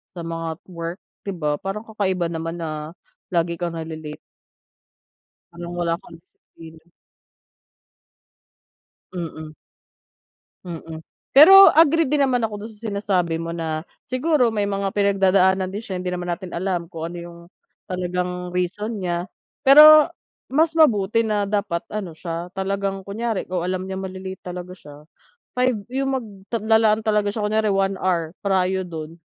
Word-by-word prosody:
sa 170 Hz, -, -6 dB
mga 165 Hz, 0 st, -4 dB, 0.2 s
work 170 Hz, +1 st, -5 dB, 0.3 s
'di -, -, -1 dB
ba 150 Hz, -3 st, -1 dB
parang 195 Hz, +3 st, -4 dB
kakaiba 190 Hz, -5 st, -1 dB
naman 165 Hz, +1 st, -5 dB
na, 155 Hz, -1 st, -5 dB, 0.4 s
lagi 170 Hz, -1 st, 0 dB
kang 170 Hz, -1 st, -3 dB
nale-late. 160 Hz, -1 st, -7 dB, 1.3 s
Parang 170 Hz, 0 st, -8 dB
wala 170 Hz, -1 st, +1 dB
kang -, -, -13 dB
disiplina. 160 Hz, -1 st, -17 dB, 2.3 s
Mm. 155 Hz, -3 st, -6 dB, 1.1 s
Mm, 165 Hz, -2 st, -8 dB, 0.3 s
pero, 385 Hz, +7 st, +11 dB
agree 325 Hz, 0 st, +4 dB
din 285 Hz, 0 st, +3 dB
naman 250 Hz, -2 st, +1 dB
ako 210 Hz, -1 st, -7 dB
dun 225 Hz, -, -8 dB
sa, 220 Hz, +1 st, -8 dB
sinasabi 195 Hz, -5 st, 0 dB
mo 165 Hz, 0 st, -4 dB
na, 160 Hz, -1 st, -3 dB, 0.2 s
"siguro 255 Hz, -1 st, +2 dB
may 210 Hz, -2 st, -1 dB
mga 200 Hz, -1 st, -1 dB
pinagdadaanan 190 Hz, -2 st, +3 dB
din 205 Hz, +3 st, -6 dB
siya 185 Hz, -2 st, -4 dB
hindi 180 Hz, -, -4 dB
naman 180 Hz, -1 st, -3 dB
natin 180 Hz, 0 st, -6 dB
alam 175 Hz, -2 st, -2 dB
kung 165 Hz, 0 st, -6 dB
ano -, -, -7 dB
yung 170 Hz, 0 st, -10 dB, 0.5 s
talagang 180 Hz, -1 st, -3 dB
reason 205 Hz, +4 st, -2 dB
niya," 175 Hz, 0 st, -2 dB, 0.3 s
pero, 300 Hz, +3 st, +9 dB, 0.4 s
mas 315 Hz, +4 st, +2 dB
mabuti 225 Hz, -6 st, +3 dB
na 210 Hz, -1 st, 0 dB
dapat 200 Hz, -4 st, -1 dB
ano 195 Hz, -6 st, -5 dB
siya, 165 Hz, +1 st, -5 dB
talagang 195 Hz, 0 st, -2 dB
kunyari, 220 Hz, +2 st, -3 dB
kung 180 Hz, -1 st, -1 dB
alam 185 Hz, 0 st, -2 dB
niyang 190 Hz, 0 st, -5 dB
male-late 190 Hz, 0 st, -7 dB
talaga 180 Hz, 0 st, -6 dB
siya, 145 Hz, -2 st, -13 dB, 0.6 s
5 255 Hz, 0 st, +3 dB, 0.2 s
yung 270 Hz, +1 st, -1 dB
magta 215 Hz, -2 st, -5 dB
lalaan 220 Hz, 0 st, +3 dB
talaga 210 Hz, -1 st, +1 dB
siya 220 Hz, -, -3 dB
kunyari 215 Hz, +1 st, +1 dB
1 195 Hz, 0 st, +1 dB
hour 170 Hz, -4 st, 0 dB
prio 190 Hz, -1 st, +1 dB
dun 160 Hz, -1 st, -7 dB
190 Hz, 145 wpm, -22 LUFS, 170-210 Hz, 2.3 s, pero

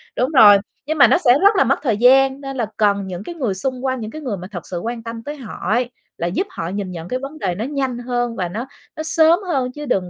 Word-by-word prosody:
đúng 255 Hz, +4 st, 0 dB
rồi. 215 Hz, -8 st, +8 dB, 0.3 s
Nhưng 310 Hz, +2 st, -2 dB
mà 280 Hz, -, +8 dB
nó -, -, +4 dB
sẽ 275 Hz, -8 st, +4 dB
rất 405 Hz, +2 st, +5 dB
là -, -, +5 dB
mất 270 Hz, +1 st, +1 dB
thời 235 Hz, -8 st, 0 dB
gian, 265 Hz, +3 st, +4 dB
nên 270 Hz, -1 st, -6 dB
là 235 Hz, -, 0 dB
cần 200 Hz, -2 st, +1 dB
những 180 Hz, 0 st, -6 dB
cái 345 Hz, -, -8 dB
người 250 Hz, -11 st, -1 dB
xung 255 Hz, +6 st, -3 dB
quanh, 260 Hz, -1 st, -1 dB
những 220 Hz, -1 st, -6 dB
cái 310 Hz, -, -8 dB
người 240 Hz, -9 st, -3 dB
mà 180 Hz, -, -8 dB
thật 175 Hz, -4 st, -7 dB
sự 175 Hz, -, -4 dB
quan 230 Hz, +4 st, -5 dB
tâm 230 Hz, 0 st, -7 dB
tới 295 Hz, +4 st, -6 dB
họ 260 Hz, -7 st, -9 dB, 0.2 s
ấy, 240 Hz, +2 st, +1 dB, 0.3 s
là 170 Hz, -, -2 dB
giúp 210 Hz, -, -2 dB
họ 165 Hz, 0 st, -5 dB
nhìn 195 Hz, 0 st, -4 dB
nhận 170 Hz, -1 st, -7 dB
cái 255 Hz, +6 st, -2 dB
vấn 280 Hz, +3 st, -8 dB
đề 180 Hz, -3 st, -2 dB
nó 215 Hz, +5 st, -3 dB
nhanh 265 Hz, -3 st, -2 dB
hơn 245 Hz, -1 st, -2 dB
và 180 Hz, -4 st, -3 dB
nó 230 Hz, +8 st, -5 dB, 0.3 s
nó 315 Hz, -, -4 dB
sớm 320 Hz, +2 st, +4 dB
hơn, 265 Hz, -7 st, -1 dB
chứ 295 Hz, +3 st, -8 dB
đừng 190 Hz, -9 st, -1 dB
245 Hz, 285 wpm, -20 LUFS, 205-275 Hz, 0.3 s, rồi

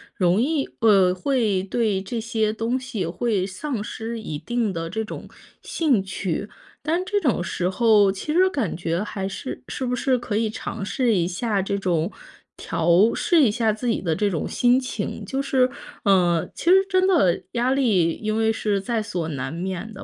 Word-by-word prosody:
容 180 Hz, +3 st, +2 dB
易 285 Hz, +1 st, 0 dB
呃， 195 Hz, -5 st, +5 dB
会 215 Hz, -4 st, 0 dB
对 205 Hz, -1 st, 0 dB
这 230 Hz, +4 st, -4 dB
些 220 Hz, -1 st, 0 dB
东 225 Hz, +3 st, -1 dB
西 250 Hz, -7 st, -4 dB
会 185 Hz, +3 st, -1 dB
丧 235 Hz, +3 st, -4 dB
失 225 Hz, +2 st, -5 dB
一 155 Hz, -9 st, -5 dB
定 225 Hz, +5 st, -1 dB
的 165 Hz, -1 st, -4 dB
这 220 Hz, +5 st, -2 dB
种 -, -, -8 dB, 0.3 s
兴 275 Hz, -, +1 dB
趣。 190 Hz, +1 st, -3 dB, 0.3 s
但 335 Hz, +5 st, 0 dB
这 410 Hz, +2 st, 0 dB
种 250 Hz, -, +1 dB
时 180 Hz, 0 st, -1 dB
候 205 Hz, 0 st, +4 dB
其 200 Hz, +11 st, -4 dB
实 370 Hz, +3 st, +4 dB
感 255 Hz, -, -2 dB
觉 170 Hz, +1 st, -2 dB
还 195 Hz, -2 st, -4 dB
是 255 Hz, -, -6 dB
是 265 Hz, -, -3 dB
不 250 Hz, 0 st, 0 dB
是 255 Hz, +1 st, +1 dB
可 235 Hz, -3 st, -4 dB
以 220 Hz, 0 st, +1 dB
尝 210 Hz, -, -5 dB
试 240 Hz, +3 st, +1 dB
一 170 Hz, -2 st, +1 dB
下 200 Hz, +3 st, -1 dB
这 200 Hz, +1 st, -2 dB
种， 175 Hz, -2 st, 0 dB, 0.5 s
调 170 Hz, +6 st, +3 dB
试 345 Hz, -, +2 dB
一 230 Hz, -, +4 dB
下 225 Hz, 0 st, +1 dB
自 220 Hz, +4 st, -4 dB
己 225 Hz, -, 0 dB
的 165 Hz, -4 st, 0 dB
这 205 Hz, +3 st, 0 dB
种 160 Hz, -, -2 dB
心 245 Hz, +1 st, +3 dB
情。 255 Hz, 0 st, -4 dB
就 270 Hz, +1 st, -2 dB
是， 260 Hz, -2 st, +2 dB, 0.4 s
呃 175 Hz, -4 st, +3 dB
其 -, -, -8 dB
实 385 Hz, +1 st, +7 dB
真 370 Hz, -1 st, +3 dB
的 290 Hz, -, +3 dB
压 245 Hz, +2 st, +1 dB
力 210 Hz, -12 st, +2 dB
因 215 Hz, +3 st, -3 dB
为 220 Hz, 0 st, +2 dB
是 210 Hz, -3 st, -1 dB
在 230 Hz, +3 st, -1 dB
所 180 Hz, -7 st, -3 dB
难 135 Hz, -1 st, -4 dB
免 190 Hz, +5 st, -4 dB
的 195 Hz, -, -9 dB
215 Hz, 205 characters per minute, -23 LUFS, 185-245 Hz, 0.5 s, 实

